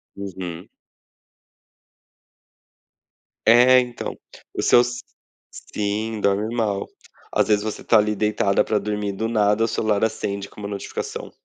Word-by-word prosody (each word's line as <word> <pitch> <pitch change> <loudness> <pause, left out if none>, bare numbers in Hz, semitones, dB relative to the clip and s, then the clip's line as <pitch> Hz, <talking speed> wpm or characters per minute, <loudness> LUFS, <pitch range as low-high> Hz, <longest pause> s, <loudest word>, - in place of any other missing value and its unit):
Uhum. 95 -3 -7 2.8
É, 125 +3 +7
então. 120 -1 -4 0.4
Os - - 0
seus 120 0 +3 0.7
sim, 105 +1 -2
dorme 105 +3 0
mal. 105 -4 -1 0.4
Às - - +2
vezes 105 -1 +2
você 110 - -5
tá 115 - +4
ali 105 0 +1
deitada 105 -1 +1
pra 105 -1 0
dormir, 105 -1 -2
do 110 +3 -3
nada 105 -1 +2
o - - -1
celular 110 -1 0
acende 100 -3 -2
com - - -15
1 100 - -4
notificação. 100 -1 -6
105 Hz, 125 wpm, -22 LUFS, 100-110 Hz, 2.8 s, É